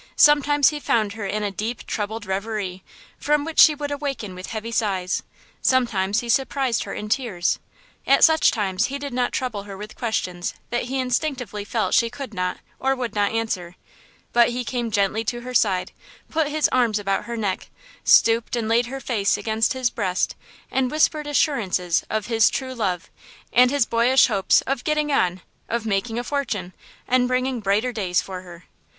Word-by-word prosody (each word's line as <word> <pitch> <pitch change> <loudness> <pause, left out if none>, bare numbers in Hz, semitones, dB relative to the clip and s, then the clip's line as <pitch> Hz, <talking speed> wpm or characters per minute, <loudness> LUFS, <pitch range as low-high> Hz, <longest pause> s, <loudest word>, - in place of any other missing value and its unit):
Sometimes 290 -1 +5
he 300 -1 -5
found 215 -7 +1
her 210 -2 -5
in 210 +1 -2
a 205 - -1
deep, 220 +5 -4
troubled 215 0 -3
reverie, 190 -1 -3 0.4
from 295 0 +1
which 325 -1 -3
she 305 - +8
would 290 0 -4
awaken 275 -9 -4
with 185 +1 -8
heavy 225 +1 -5
sighs. 190 -6 0 0.4
Sometimes 210 -6 +2
he 240 - -7
surprised 260 0 +1
her - - -6
in 210 - -5
tears. 210 -7 0 0.5
At - - +5
such 320 -1 +6
times 195 -2 0
he 275 - -4
did 280 -2 -6
not 245 0 0
trouble 250 -6 -2
her 200 -1 -8
with 210 +2 -9
questions 180 -7 -2 0.2
that 240 0 -1
he 265 +2 -2
instinctively 250 -5 -2
felt 220 +2 -1
she 230 -1 +4
could 255 -1 -8
not 180 -1 -2 0.2
or 270 0 +1
would 250 -3 -4
not 205 -1 +1
answer; 200 -6 -3 0.6
but 240 0 +5
he 245 +1 -3
came 240 -1 -2
gently 205 +1 +1
to 240 +2 -2
her 250 +1 -7
side, 195 -7 +2 0.4
put 320 -2 +1
his 305 +1 +2
arms 235 -4 +2
about 195 -1 -1
her 235 0 -5
neck, 200 -4 -2 0.3
stooped 230 +1 +4
and 230 -2 -2
laid 235 +2 +2
her 270 +2 -5
face 220 -7 0
against 220 0 0
his 255 -2 0
breast 185 0 -1 0.4
and 260 -1 +1
whispered 305 +1 +1
assurances 200 - +1
of 215 -2 -1
"his 225 -1 +4
true 260 -1 -4
love" 185 -8 -2 0.4
and 250 +1 +6
his 280 -2 +2
boyish 240 +3 +4
hopes 200 -5 +3
of 270 -2 -3
"getting 300 -1 0
on," 185 -9 +1 0.3
of 235 -1 -2
"making 220 +2 -1
a 240 - -1
fortune" 225 -10 -3 0.3
and 250 0 +3
bringing 255 0 0
"brighter 210 +4 +1
days" 185 -6 0
for 185 -1 -5
her. 175 -1 -13
230 Hz, 185 wpm, -23 LUFS, 200-260 Hz, 0.6 s, she